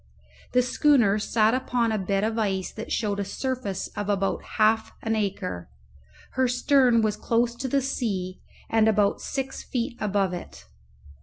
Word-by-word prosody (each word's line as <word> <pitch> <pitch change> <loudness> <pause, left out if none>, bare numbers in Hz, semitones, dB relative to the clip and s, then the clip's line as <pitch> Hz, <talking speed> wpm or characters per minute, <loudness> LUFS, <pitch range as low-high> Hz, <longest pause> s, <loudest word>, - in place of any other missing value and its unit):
The 250 - +4
schooner 245 -5 +3
sat 220 +1 +2
upon 250 -3 0
a 215 - 0
bed 195 +1 0
of 225 +1 0
ice 190 -3 -1
that 220 - -8
showed 205 -3 0
a - - 0
surface 205 -2 -3
of 205 0 -5
about 195 -1 0 0.2
half 220 0 +3
an 225 0 0
acre; 195 - -3 0.6
her 260 0 +1
stern 250 -2 +3
was 215 -1 +1
close 235 +2 +1
to 265 - -3
the 275 +1 +1
sea, 195 -9 -3 0.3
and 225 -1 +3
about 210 -2 +2
six 270 -1 -4
feet 235 -1 -3
above 200 -3 0
it. 175 - -8
220 Hz, 160 wpm, -26 LUFS, 200-245 Hz, 0.6 s, The